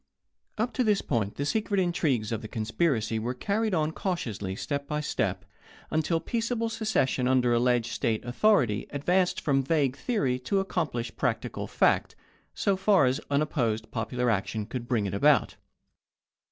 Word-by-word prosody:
Up 225 +3 -1
to 255 - +1
this 210 -3 +2
point 110 -6 -1
the 140 - -2
secret 205 +4 0
intrigues 150 - 0
of 115 -1 -2
the 110 - -7
conspiracy 110 0 0
were 120 +3 -3
carried 210 - 0
on 155 -1 +1
cautiously 110 - -3
step 140 +5 -3
by 150 0 -1
step, 100 -10 -2 0.5
until 160 +1 +1
peaceable 230 +5 -1
secession 210 - 0
under 125 -2 +3
alleged 120 -1 +2
State 110 0 -1
authority 120 - +2
advanced 180 +6 +1
from 135 -2 +1
vague 140 -2 +1
theory 140 - -1
to 130 +10 -3
accom 185 -5 0
plished 120 -1 -5
practical - - -2
fact, - - +2 0.4
so 200 - +1
far 190 -4 +4
as 130 +3 +1
unopposed 125 -7 0
popular 120 +1 -1
action 105 +1 -2
could 120 +2 -6
bring 115 -5 +1
it 100 - -3
about. 145 +7 +3
135 Hz, 155 wpm, -28 LUFS, 115-180 Hz, 0.5 s, far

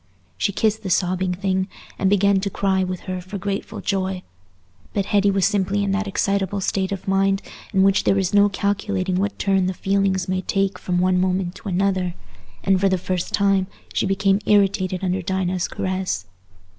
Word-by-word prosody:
She 200 - 0
kissed 220 +2 0
the 195 - -5
sobbing 185 0 +1
thing, 190 0 0 0.3
and 190 - +2
began 200 0 +4
to 200 +1 -2
cry 190 -1 +1
with 185 -1 -4
her 185 -2 -4
for 185 +3 -7
grateful 200 +1 -4
joy. 190 -2 -1 0.7
But 200 -2 +1
Hetty 200 0 +3
was 195 -1 +2
simply 200 0 +1
in 200 - 0
that 205 +1 -1
excitable 200 0 0
state 190 0 -1
of 195 -1 -5
mind 195 +1 +2 0.3
in 190 -2 +3
which 195 0 +3
there 195 - +3
is 190 -1 0
no 205 0 +5
calculating 200 -2 -1
what 200 +2 -1
turn 195 -2 +2
the 185 - -2
feelings 195 -1 0
may 185 0 0
take 195 +1 -1
from 180 -1 -1
one 180 0 +3
moment 185 -1 0
to 205 - -7
another, 185 -1 0 0.5
and 190 -1 +2
for 195 - +4
the 190 - +2
first 180 0 -3
time 195 -2 +2 0.3
she - - +1
became 195 0 +2
irritated 195 -2 +2
under 185 0 0
Dinah's 185 -1 -1
caress. 185 - -2
190 Hz, 185 wpm, -22 LUFS, 185-200 Hz, 0.7 s, no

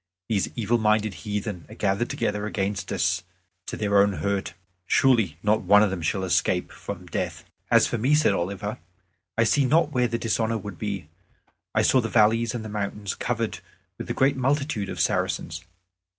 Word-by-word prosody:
These 100 -4 +1
evil 115 +1 +1
minded 110 -1 +2
heathen 105 -4 -4
are - - -10
gathered 100 +3 0
together 105 0 -1
against 100 -2 -2
us 85 0 +1 0.5
to - - -4
their 100 -1 +2
own 100 0 +3
hurt. 100 0 -2 0.3
Surely 115 - +3
not 105 +1 +3
one 105 +1 +6
of 105 - +1
them 95 -3 -3
shall 95 +4 -1
escape 90 0 +1
from - - -7
death." - - -4 0.2
"As - - +6
for 120 - -2
me," 135 +7 +3
said 155 - +3
Oliver, 100 +3 -3 0.6
"I 115 - +5
see 125 +6 +3
not 150 +3 +3
where 125 -3 +2
the 115 0 -2
dishonor 115 0 0
would 100 -4 -8
be. 100 -7 -4 0.7
I - - +4
saw 130 - +4
the 115 - -3
valleys 115 +2 +3
and 110 -2 -4
the - - -4
mountains 105 -1 -3
covered 115 -2 -2 0.4
with - - -5
the - - -3
great 135 +1 +3
multitude 135 -5 0
of - - -5
Saracens. 80 +2 -1
105 Hz, 180 wpm, -25 LUFS, 100-115 Hz, 0.7 s, one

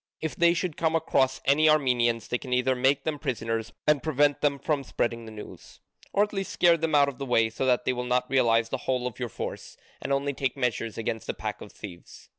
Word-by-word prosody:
If 160 - -4
they 170 0 +4
should 175 -3 -2
come 165 -1 +1
across 135 -5 +1
any 155 +3 +4
Armenians 125 -6 +2
they 120 - -1
can 130 - -9
either 125 +1 +2
make 135 +2 +2
them 150 -2 -2
prisoners 115 -5 -3
and 150 -2 +3
prevent 145 -1 +2
them 145 -1 +2
from 145 0 -1
spreading 115 -2 -2
the 110 - -9
news, 105 -1 -11 0.3
or 200 - +3
at 210 - -4
least 195 -1 -3
scare 170 -1 +4
them 160 -1 -1
out 140 -1 +5
of 140 -2 -6
the - - -3
way, 115 -2 +2
so 130 +4 -2
that 125 -1 +2
they - - +1
will 125 0 -3
not 125 0 +1
realise 115 -3 +2
the 130 - -2
whole 125 -1 +1
of 125 -1 -5
your 120 -1 -3
force, - - -7 0.2
and - - -4
only 140 +1 0
take 135 0 -2
measures 120 -3 -2
against 115 0 -4
a - - -2
pack - - -5
of - - -10
thieves. 85 -1 -12
130 Hz, 235 wpm, -27 LUFS, 120-150 Hz, 0.3 s, out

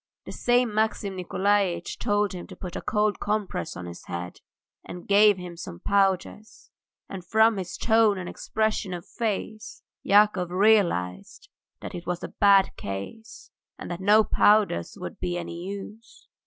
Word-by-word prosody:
The - - -8
same 245 -2 +1
Maxim 215 -2 -1
Nikolaitch 185 -1 0
told 205 -1 0
him 180 -1 -8
to - - -11
put 180 -2 -8
a - - -4
cold 210 -1 0
compress 210 - -3
on 90 - -7
his 85 0 -10
head, 90 0 -6 0.5
and 175 0 -10
gave 205 0 +5
him 180 -1 -8
some 85 - -9
powders, 200 +2 -1 0.4
and 190 -2 -8
from 220 +4 +3
his 185 -2 -5
tone 220 -3 +3
and 180 -1 -6
expression 215 -4 -2
of 175 - -9
face 215 0 -5 0.2
Yakov 200 -3 +3
realized 180 - +1 0.3
that - - -7
it 175 -1 -8
was 180 -1 -3
a - - -5
bad 200 -2 +4
case 100 - -8 0.3
and - - -8
that 175 +1 -5
no 210 +3 +5
powders 205 - +2
would 90 - -7
be 175 -1 -2
any 170 0 -6
use. 215 - -9
200 Hz, 155 wpm, -25 LUFS, 175-215 Hz, 0.5 s, gave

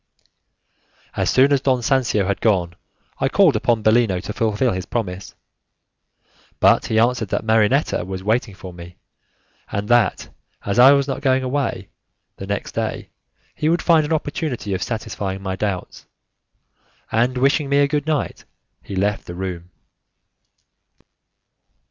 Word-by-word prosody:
As - - 0
soon 135 +2 +4
as 140 - +2
Don 130 -2 +1
Sancio 120 -6 +1
had 100 0 -2
gone, 90 -6 +1 0.5
I 135 - +1
called 185 - +4
upon 110 0 +1
Bellino 110 -4 +3
to 105 - -6
fulfil 115 +3 0
his 95 0 -4
promise, 95 -5 -4 1.2
but - - +4
he 110 - 0
answered 115 -1 +2
that - - -1
Marinetta 110 - +2
was 95 +1 -6
waiting 110 -1 0
for 95 -1 -10
me, 85 0 -12 0.7
and 100 +1 -3
that, 120 -5 +2 0.4
as 100 +4 0
I 130 +3 +9
was 140 -1 +1
not 135 0 -3
going 130 -2 +2
away 130 -7 -2 0.5
the 95 - -8
next 100 0 -3
day, - - -4 0.4
he 155 - -1
would 170 +1 +1
find 165 -3 +4
an 150 - -5
opportunity 145 - -2
of 95 - -3
satisfying 100 -4 -4
my 95 -1 -3
doubts; 95 -2 -4 1.0
and 120 +3 +1
wishing 140 +2 +2
me 140 - +2
a 145 0 +4
good 145 +1 -2
night, 155 -3 -2 0.4
he 100 - -8
left 100 +2 -1
the 85 - -7
room. 90 -2 -5
115 Hz, 150 wpm, -21 LUFS, 95-135 Hz, 1.2 s, I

